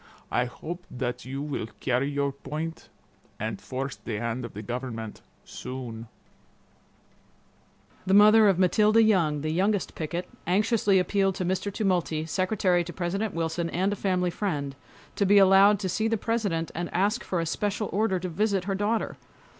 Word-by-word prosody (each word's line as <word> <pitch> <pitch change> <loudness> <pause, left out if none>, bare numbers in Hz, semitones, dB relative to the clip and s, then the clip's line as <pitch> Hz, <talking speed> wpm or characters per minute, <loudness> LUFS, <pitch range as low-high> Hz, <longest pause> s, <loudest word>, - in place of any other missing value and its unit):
I 120 - +2
hope 170 +8 -7
that 125 -1 -4
you 135 +2 -4
will 145 -7 -3
carry 130 +2 0
your 140 -1 0
point 150 +4 -6 0.5
and 110 -1 -4
force 130 +1 -4
the 110 - -5
hand 115 +3 -3
of 115 - -8
the 105 - -6
government 115 -2 -5 0.2
soon'." 120 -3 -7 2.0
The 190 - +4
mother 215 +1 +7
of 190 - +2
Matilda 210 +4 +4
Young, 165 -9 +2
the 155 +1 -2
youngest 195 +4 0
picket, 170 +3 -4 0.2
anxiously 205 +1 +3
appealed 195 0 +1
to 185 - -2
Mr. 190 +3 -1
Tumulty, 180 -6 0
Secretary 185 0 +1
to 175 - -7
President 190 +4 -2
Wilson, 165 +1 -1
and 190 +4 0
a - - -2
family 180 -2 0
friend, 145 -9 -3 0.4
to - - +2
be 205 +1 +6
allowed 195 +1 +7
to 190 - -1
see 220 +5 0
the 225 0 +1
President 200 -8 -1
and 175 +1 -4
ask 205 +6 +1
for 180 - -2
a 165 - -1
special 205 +5 -1
order 210 -2 +1
to 185 - -4
visit 195 +2 0
her 195 +1 -2
daughter. 205 +3 -1
180 Hz, 165 wpm, -27 LUFS, 140-200 Hz, 2.0 s, mother